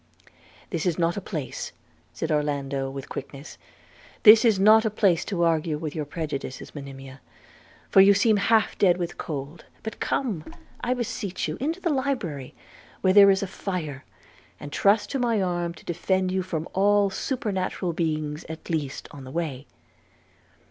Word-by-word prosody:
'This 170 Hz, 0 st, -1 dB
is 170 Hz, -, 0 dB
not 170 Hz, 0 st, +1 dB
a 200 Hz, -, -3 dB
place,' 155 Hz, -8 st, -5 dB, 0.4 s
said -, -, -4 dB
Orlando 140 Hz, -2 st, -1 dB
with 135 Hz, 0 st, -7 dB
quickness, 140 Hz, +2 st, -8 dB, 0.6 s
'this 215 Hz, +2 st, +9 dB
is 215 Hz, -4 st, +4 dB
not 215 Hz, +3 st, +7 dB
a 220 Hz, -, +1 dB
place 200 Hz, -5 st, +2 dB
to 180 Hz, -5 st, -1 dB
argue 165 Hz, -2 st, +1 dB
with 155 Hz, -1 st, -5 dB
your 155 Hz, -3 st, -3 dB
prejudices, 145 Hz, -4 st, -5 dB
Monimia, 135 Hz, -2 st, -9 dB, 0.7 s
for 195 Hz, -, +6 dB
you 200 Hz, +1 st, +7 dB
seem 215 Hz, +1 st, +4 dB
half 220 Hz, +2 st, +2 dB
dead 180 Hz, -3 st, +4 dB
with 175 Hz, -1 st, -4 dB
cold; 150 Hz, +1 st, -6 dB, 0.2 s
but 220 Hz, -, -6 dB
come, 215 Hz, -, -1 dB, 0.4 s
I 250 Hz, +1 st, +1 dB
beseech 210 Hz, -6 st, -3 dB
you, -, -, -3 dB
into 320 Hz, +6 st, -1 dB
the 345 Hz, -3 st, 0 dB
library, 225 Hz, -, -3 dB, 0.5 s
where 185 Hz, -1 st, +3 dB
there 200 Hz, 0 st, +9 dB
is 195 Hz, 0 st, +3 dB
a -, -, -2 dB
fire, 165 Hz, -8 st, -5 dB, 0.6 s
and 145 Hz, -, -8 dB
trust 205 Hz, +5 st, +2 dB
to 275 Hz, -, -1 dB
my 235 Hz, -3 st, +1 dB
arm 175 Hz, -2 st, -1 dB
to -, -, -16 dB
defend 185 Hz, +2 st, 0 dB
you 190 Hz, 0 st, 0 dB
from 170 Hz, -3 st, -4 dB
all 200 Hz, +1 st, +3 dB
supernatural 190 Hz, -7 st, -2 dB
beings 155 Hz, -2 st, -2 dB
at 160 Hz, +1 st, -7 dB
least, 145 Hz, -4 st, -3 dB
on 140 Hz, -2 st, -10 dB
the 130 Hz, -, -9 dB
way.' 145 Hz, -3 st, -4 dB
175 Hz, 165 wpm, -25 LUFS, 150-205 Hz, 0.7 s, this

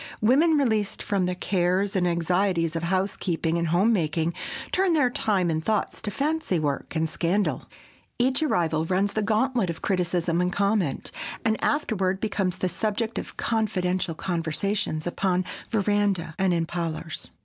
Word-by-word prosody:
Women, 295 Hz, +9 st, +4 dB
released 220 Hz, -7 st, 0 dB
from 195 Hz, -3 st, 0 dB
the 180 Hz, -, -1 dB
cares 185 Hz, +2 st, +1 dB
and 180 Hz, -2 st, +2 dB
anxieties 170 Hz, 0 st, +1 dB
of 165 Hz, -, -1 dB
housekeeping 170 Hz, -2 st, 0 dB
and 170 Hz, -, 0 dB
home 185 Hz, +8 st, +3 dB
making, 165 Hz, -2 st, 0 dB, 0.4 s
turn 370 Hz, -2 st, +2 dB
their 290 Hz, -6 st, +3 dB
time 190 Hz, -8 st, +1 dB
and 160 Hz, 0 st, -1 dB
thoughts 215 Hz, +2 st, -1 dB
to 210 Hz, -, -3 dB
fancy 295 Hz, -, 0 dB
work 145 Hz, 0 st, -2 dB
and 160 Hz, 0 st, +1 dB
scandal. 175 Hz, +6 st, 0 dB, 0.6 s
Each 260 Hz, +4 st, +2 dB
arrival 165 Hz, -, +1 dB
runs 190 Hz, +3 st, +1 dB
the 215 Hz, -, 0 dB
gantlet 220 Hz, 0 st, +1 dB
of 165 Hz, -, -5 dB
criticism 175 Hz, -2 st, +1 dB
and 180 Hz, 0 st, +1 dB
comment, 200 Hz, -6 st, 0 dB, 0.3 s
and 220 Hz, -1 st, +1 dB
afterward 195 Hz, -10 st, +1 dB
becomes 195 Hz, -4 st, -1 dB
the 185 Hz, -, 0 dB
subject 220 Hz, +4 st, -2 dB
of -, -, -8 dB
"confidential" 185 Hz, -6 st, 0 dB
conversations 170 Hz, 0 st, -2 dB
upon 185 Hz, +1 st, 0 dB, 0.2 s
veranda 205 Hz, -5 st, +1 dB
and 190 Hz, -1 st, +3 dB
in 170 Hz, -1 st, +1 dB
parlors. 165 Hz, -1 st, -4 dB
185 Hz, 150 wpm, -26 LUFS, 170-215 Hz, 0.6 s, Women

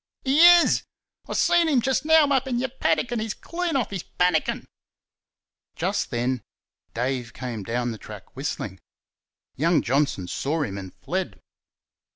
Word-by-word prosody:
"He 270 Hz, +2 st, +2 dB
IS. 345 Hz, 0 st, +7 dB, 0.5 s
I -, -, -3 dB
seen 345 Hz, -1 st, +3 dB
'im 275 Hz, -5 st, +3 dB
just 265 Hz, +4 st, 0 dB
now 320 Hz, -1 st, +6 dB
up 265 Hz, -1 st, +1 dB
in 250 Hz, -2 st, -1 dB
your 260 Hz, +2 st, -1 dB
paddick, 235 Hz, -3 st, 0 dB
an' 240 Hz, -, -1 dB
he's 215 Hz, -1 st, -3 dB
clean 340 Hz, -2 st, -3 dB
off 250 Hz, -6 st, 0 dB
he's 195 Hz, -3 st, -3 dB
pannikin." 180 Hz, -3 st, 0 dB, 1.1 s
Just -, -, -1 dB
then 120 Hz, +1 st, -1 dB, 0.5 s
Dave 125 Hz, 0 st, -2 dB
came 120 Hz, -4 st, -5 dB
down 120 Hz, +4 st, -2 dB
the 110 Hz, -, -8 dB
track 105 Hz, +1 st, -12 dB
whistling. 120 Hz, -8 st, -4 dB, 0.8 s
Young 165 Hz, +4 st, +2 dB
Johnson 135 Hz, -8 st, 0 dB
saw 150 Hz, -, -1 dB
him 100 Hz, -7 st, -4 dB
and 95 Hz, -1 st, -8 dB
fled. -, -, -4 dB
160 Hz, 155 wpm, -24 LUFS, -, 1.1 s, IS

